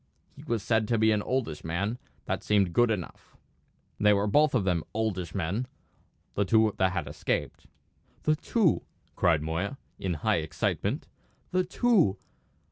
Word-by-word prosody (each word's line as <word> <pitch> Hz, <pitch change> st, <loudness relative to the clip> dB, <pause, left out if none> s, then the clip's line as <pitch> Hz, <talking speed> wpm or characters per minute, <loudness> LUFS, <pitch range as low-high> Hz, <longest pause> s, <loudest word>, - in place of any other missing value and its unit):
He -, -, -12 dB
was 115 Hz, -4 st, -2 dB
said 110 Hz, -2 st, +1 dB
to 115 Hz, -, +1 dB
be 110 Hz, 0 st, +4 dB
an 105 Hz, -1 st, +2 dB
oldish 115 Hz, -, -2 dB
man; 100 Hz, +9 st, -2 dB, 0.3 s
that -, -, -2 dB
seemed 100 Hz, -4 st, +2 dB
good 120 Hz, +3 st, +4 dB
enough; 100 Hz, -6 st, -5 dB, 0.6 s
they 105 Hz, 0 st, +5 dB
were 100 Hz, 0 st, +2 dB
both 145 Hz, +7 st, +3 dB
of 115 Hz, -, +2 dB
them 90 Hz, -4 st, +1 dB
oldish 100 Hz, -6 st, -2 dB
men, 100 Hz, +7 st, -1 dB, 0.7 s
the 100 Hz, -, +1 dB
two 110 Hz, +1 st, +3 dB
that 95 Hz, 0 st, +3 dB
had 90 Hz, -5 st, -2 dB
escaped." -, -, -3 dB, 0.6 s
"The 155 Hz, -, +3 dB
two!" 190 Hz, +2 st, +2 dB, 0.3 s
cried 80 Hz, -4 st, +2 dB
Moya 85 Hz, -, -2 dB, 0.2 s
in 90 Hz, -3 st, -1 dB
high 105 Hz, +7 st, +1 dB
excitement. 80 Hz, -1 st, -2 dB, 0.4 s
"The 185 Hz, 0 st, +2 dB
two! 180 Hz, -, +2 dB
105 Hz, 155 wpm, -28 LUFS, 90-120 Hz, 0.7 s, they